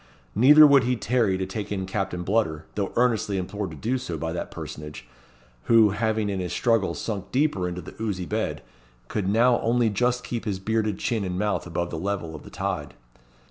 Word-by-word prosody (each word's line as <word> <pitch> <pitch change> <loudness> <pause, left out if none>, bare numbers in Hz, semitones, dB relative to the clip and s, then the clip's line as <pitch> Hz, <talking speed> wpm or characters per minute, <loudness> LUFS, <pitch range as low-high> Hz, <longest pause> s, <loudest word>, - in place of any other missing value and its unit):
Neither 150 - +8
would 140 -3 +6
he 125 +1 +1
tarry 115 -4 +1
to 95 - -2
take 100 +2 -5
in 95 -2 -2
Captain 95 -2 -3
Bludder, 90 -6 0
though 100 -2 -2
earnestly 115 -5 +1
implored 100 +2 -3
to 80 - -9
do 125 - -1
so 85 -10 -5
by 80 +2 -3
that 85 - -4
personage, 75 -5 -8 0.6
who, 115 -3 +6
having 110 0 0
in 100 -2 -2
his 90 -1 -3
struggles 115 -5 +1
sunk 100 -3 -4
deeper 130 -10 +1
into 90 +1 -5
the - - -10
oozy 100 -5 -2
bed, - - -2 0.5
could 100 -3 -2
now 120 +4 +4
only 115 -1 +2
just 125 +4 0
keep 120 -2 -4
his 100 -3 -1
bearded 110 0 -1
chin 115 -4 -1
and 90 -1 -3
mouth 105 -2 -1
above 85 0 -3
the 80 - -4
level 95 -3 -3
of 75 - -8
the - - -12
tide. - - -4
105 Hz, 200 wpm, -25 LUFS, 90-115 Hz, 0.6 s, Neither